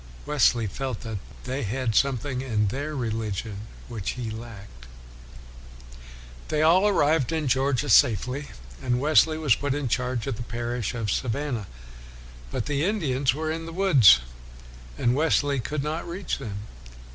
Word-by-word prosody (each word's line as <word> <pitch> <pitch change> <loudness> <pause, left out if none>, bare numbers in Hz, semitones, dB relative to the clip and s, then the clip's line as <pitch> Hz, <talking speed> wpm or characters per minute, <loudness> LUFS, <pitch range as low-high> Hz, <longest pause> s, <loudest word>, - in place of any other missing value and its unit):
Wesley 125 -5 +3
felt 130 +3 -4
that 110 -3 -5 0.2
they 130 +2 -3
had 115 +2 -1
something 130 +1 +1
in 110 -6 0
their 145 +7 -4
religion 110 -3 -3 0.2
which 110 -6 -4
he 120 -3 -5
lacked. 100 - -10 1.6
They 155 0 +1
all 180 +6 +5
arrived 155 - +2
in 160 -3 -1
Georgia 135 +2 +1
safely, 125 +6 +3 0.3
and 120 0 0
Wesley 155 +2 +4
was 150 -6 +3
put 145 +2 -1
in 145 -2 -2
charge 125 -1 -1
of - - -3
the - - -6
parish 120 0 -3
of 110 -4 -2
Savannah. 120 -3 -2 0.8
But - - -3
the 145 0 -1
Indians 140 - +1
were 155 +1 -2
in 165 +1 -4
the - - -6
woods, 140 - +6 0.8
and 120 - +2
Wesley 145 -1 +2
could 140 +4 -3
not 155 +3 -3
reach 180 +3 -3
them. 105 -7 -6
130 Hz, 145 wpm, -25 LUFS, 115-150 Hz, 1.6 s, woods